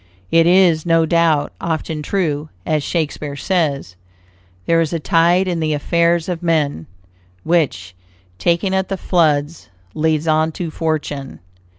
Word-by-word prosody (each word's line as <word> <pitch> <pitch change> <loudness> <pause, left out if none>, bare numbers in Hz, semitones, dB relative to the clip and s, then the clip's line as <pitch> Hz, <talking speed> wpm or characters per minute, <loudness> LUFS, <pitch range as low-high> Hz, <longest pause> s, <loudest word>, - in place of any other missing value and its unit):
It 165 0 +4
is, 175 -3 +4
no 165 -1 +3
doubt, 165 -2 +1
often 160 -1 -3
true, 155 -3 -2 0.2
as 155 -2 0
Shakespeare 150 -2 -3
says: 145 - -1 0.7
"There 165 0 +3
is 165 0 -2
a 165 - -1
tide 170 +6 +2
in 175 -2 -1
the 155 -1 0
affairs 170 +2 +1
of 180 -2 -3
men, 155 - 0 0.6
Which, 115 - 0 0.5
taken 175 +3 +1
at 190 -1 0
the 195 - -2
flood, 155 -5 +1 0.4
leads 160 0 0
on 155 0 +2
to 170 -1 -5
fortune." 150 -4 -3
160 Hz, 135 wpm, -18 LUFS, 150-170 Hz, 0.7 s, It